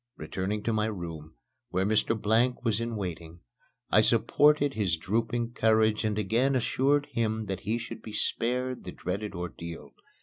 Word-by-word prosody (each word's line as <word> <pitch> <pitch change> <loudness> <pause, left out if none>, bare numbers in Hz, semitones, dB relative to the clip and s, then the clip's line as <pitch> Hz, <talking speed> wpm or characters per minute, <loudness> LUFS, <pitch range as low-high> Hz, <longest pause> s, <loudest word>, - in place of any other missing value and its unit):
Returning 100 +2 -3
to 115 - 0
my 110 0 +1
room, 80 -6 -6 0.3
where 95 +1 0
Mr. 110 +2 +2
Blank 120 +4 +2
was 115 -1 +1
in 115 0 -3
waiting, 85 -4 -6 0.5
I - - +6
supported 145 -1 +4
his 95 -8 0
drooping 115 +6 -1
courage 110 -1 +3
and 105 -1 0
again 115 +7 +2
assured 140 +3 +2
him 110 -3 -1
that 95 -2 -3
he 110 +3 -1
should 120 - -7
be 110 - -9
spared 125 +3 -1
the 90 - -7
dreaded 100 +3 -4
ordeal. 85 -1 -7
110 Hz, 160 wpm, -28 LUFS, 95-120 Hz, 0.5 s, I